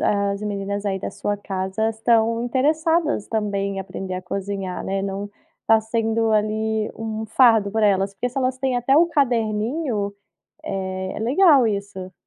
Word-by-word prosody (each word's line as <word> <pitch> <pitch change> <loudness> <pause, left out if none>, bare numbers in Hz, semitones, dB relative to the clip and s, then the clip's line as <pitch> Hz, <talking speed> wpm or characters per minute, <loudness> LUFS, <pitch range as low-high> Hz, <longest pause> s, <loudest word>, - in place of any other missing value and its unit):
as 200 -1 0
meninas 200 0 -3
aí 195 -1 -1
da - - -5
sua 205 0 -2
casa 195 +2 -2
estão 225 +1 +2
interessadas 305 +2 +1
também 200 -3 -1
em - - -2
aprender 190 -1 -6
a 185 - -5
cozinhar, 195 0 -4
né, 195 0 -2
não 200 +1 -4 0.3
está 225 0 +4
sendo, 225 0 0
ali, 215 0 0
um 220 0 -4
fardo 225 -3 +4
para 220 0 +2
elas, 195 0 +1
porque 245 +6 -2
se 245 - -17
elas 255 -1 0
têm 260 -2 0
até 245 +3 +2
o 335 +3 +6
caderninho, 230 -4 0 0.5
eh, 190 -1 -3
é - - -5
legal 275 - +5
isso. 200 -2 -5
215 Hz, 160 wpm, -22 LUFS, 200-235 Hz, 0.5 s, o